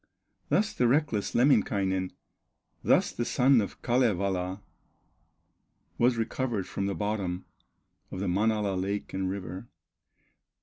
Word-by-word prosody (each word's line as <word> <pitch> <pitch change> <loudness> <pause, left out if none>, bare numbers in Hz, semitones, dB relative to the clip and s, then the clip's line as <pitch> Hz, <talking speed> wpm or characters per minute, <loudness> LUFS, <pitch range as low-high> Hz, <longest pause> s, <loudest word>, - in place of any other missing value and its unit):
Thus 215 +1 +2
the 125 - +2
reckless 130 -5 +1
Lemminkainen, 100 -7 +2 0.7
Thus - - +3
the 120 - -2
son 130 0 +4
of 100 - -6
Kalevala, 100 -6 0 1.4
Was 120 0 +3
recovered 115 -3 -1
from 100 - -3
the 100 - -2
bottom 100 -4 -2 0.6
Of - - -6
the 100 - -2
Manala 105 +2 +1
lake 100 +2 -3
and 95 -1 -1
river. 95 +2 -6
105 Hz, 115 wpm, -28 LUFS, 95-120 Hz, 1.4 s, son